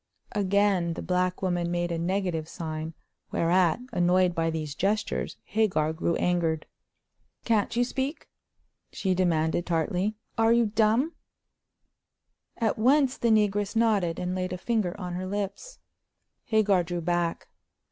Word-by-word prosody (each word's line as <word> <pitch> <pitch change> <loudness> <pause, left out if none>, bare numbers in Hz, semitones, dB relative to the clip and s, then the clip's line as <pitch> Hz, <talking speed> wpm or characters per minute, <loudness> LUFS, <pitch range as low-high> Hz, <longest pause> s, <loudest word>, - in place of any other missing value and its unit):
Again 200 -3 +2
the - - -6
black 180 0 0
woman 175 -2 0
made 175 0 -1
a 165 - -2
negative 175 -3 -1
sign, 160 -1 -5 0.3
whereat, 175 +4 +2
annoyed 180 -2 +3
by 165 -1 0
these 155 -3 -3
gestures, 205 +7 -1
Hagar 190 -8 +1
grew 170 +1 0
angered. 165 -3 0 0.8
"Can't 225 0 +1
you 240 - +3
speak?" 265 +4 -3 0.6
she 190 -2 0
demanded, 170 -2 +1
tartly. 180 +5 0 0.2
"Are 225 +1 +5
you 235 0 +4
dumb?" 225 +8 +2 1.4
At 225 -2 0
once 270 +3 +4
the 235 - 0
negress 205 -1 +2
nodded, 210 -7 +2
and 180 0 -2
laid 185 0 -2
a - - -3
finger 205 -2 -1
on 180 -2 -5
her 185 +1 -4
lips. 205 - -4 0.7
Hagar 210 -4 +3
drew 175 0 -4
back. 175 0 -1
185 Hz, 135 wpm, -27 LUFS, 170-215 Hz, 1.4 s, Are